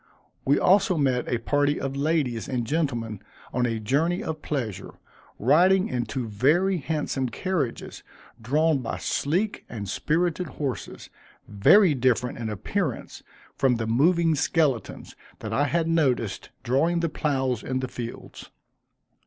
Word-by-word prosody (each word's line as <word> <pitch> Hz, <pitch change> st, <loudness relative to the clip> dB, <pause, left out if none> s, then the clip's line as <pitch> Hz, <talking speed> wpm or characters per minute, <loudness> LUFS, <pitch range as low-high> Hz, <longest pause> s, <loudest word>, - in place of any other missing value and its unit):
We 140 Hz, +2 st, +4 dB
also 190 Hz, 0 st, +3 dB
met 130 Hz, -4 st, +1 dB
a 120 Hz, -, +2 dB
party 145 Hz, +4 st, +1 dB
of 135 Hz, 0 st, -3 dB
ladies 140 Hz, -6 st, -1 dB
and 125 Hz, -3 st, -1 dB
gentlemen 120 Hz, -, -2 dB, 0.3 s
on 125 Hz, 0 st, +1 dB
a 115 Hz, -1 st, -2 dB
journey 160 Hz, -, 0 dB
of 155 Hz, -1 st, -5 dB
pleasure, 120 Hz, -, -4 dB, 0.4 s
riding 180 Hz, -, +4 dB
in 120 Hz, -2 st, -2 dB
two 130 Hz, -3 st, -3 dB
very 155 Hz, -, +2 dB
handsome 145 Hz, -4 st, -2 dB
carriages, 155 Hz, -6 st, -3 dB, 0.4 s
drawn 150 Hz, +5 st, +2 dB
by 120 Hz, -, -4 dB
sleek 185 Hz, +9 st, -1 dB
and 105 Hz, -4 st, -6 dB
spirited 170 Hz, -, 0 dB
horses, 135 Hz, -2 st, -5 dB, 0.4 s
very 155 Hz, -, +5 dB
different 125 Hz, -2 st, 0 dB
in 115 Hz, -2 st, -3 dB
appearance 135 Hz, -, -3 dB, 0.3 s
from 130 Hz, -2 st, +2 dB
the 115 Hz, -1 st, -2 dB
moving 165 Hz, +8 st, +3 dB
skeletons 150 Hz, -4 st, -1 dB, 0.2 s
that 110 Hz, 0 st, -6 dB
I 145 Hz, +6 st, +2 dB
had 165 Hz, +2 st, 0 dB
noticed 130 Hz, -11 st, 0 dB
drawing 160 Hz, +8 st, +1 dB
the 170 Hz, -, +1 dB
ploughs 135 Hz, -6 st, -1 dB
in 130 Hz, 0 st, -2 dB
the 130 Hz, -, -3 dB
fields. 120 Hz, -1 st, -8 dB
140 Hz, 135 wpm, -25 LUFS, 120-165 Hz, 0.4 s, very